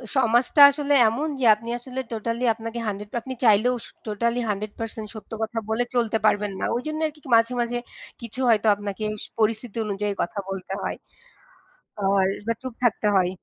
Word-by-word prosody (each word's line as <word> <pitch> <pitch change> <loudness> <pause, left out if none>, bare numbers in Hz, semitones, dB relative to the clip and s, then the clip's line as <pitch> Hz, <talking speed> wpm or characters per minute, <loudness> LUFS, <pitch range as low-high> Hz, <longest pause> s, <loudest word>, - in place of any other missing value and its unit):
সমাজটা 245 +3 +3
আসলে 290 0 -1
এমন 265 +8 -1
যে 250 - +1
আপনি 230 +2 -9
আসলে 255 +1 -7
টোটালি 230 +2 -3
আপনাকে 230 +1 -6
100 205 0 -4
আপনি 260 +2 -6
চাইলেও 225 +4 +5
শ - - -10 0.2
টোটালি 235 +3 0
100% 215 +2 -4
সত্য 215 -2 -11
কথা 225 +1 -4
বলে 220 +2 +2
চলতে 230 -2 +2
পারবেন 205 -1 +2
না। - - -4
ওইজন্য 310 +5 -3
আর - - -7
কি - - -18 0.2
মাঝে, 230 +2 +3
মাঝে 240 +1 -1 0.4
কিছু 235 +2 -6
হয়তো 220 -1 +3
আপনাকে 205 +1 -5 0.3
পরিস্থিতি 220 +1 0
অনুযায়ী 205 0 -1
কথা 200 +4 -3
বলতে 195 0 -5
হয়। - - -2 1.1
আর 195 0 +3 0.2
বা 230 - +2
চুপ 260 -2 -6
থাকতে 225 -2 +2
হয়। 185 -1 +3
225 Hz, 170 wpm, -24 LUFS, 210-240 Hz, 1.1 s, চাইলেও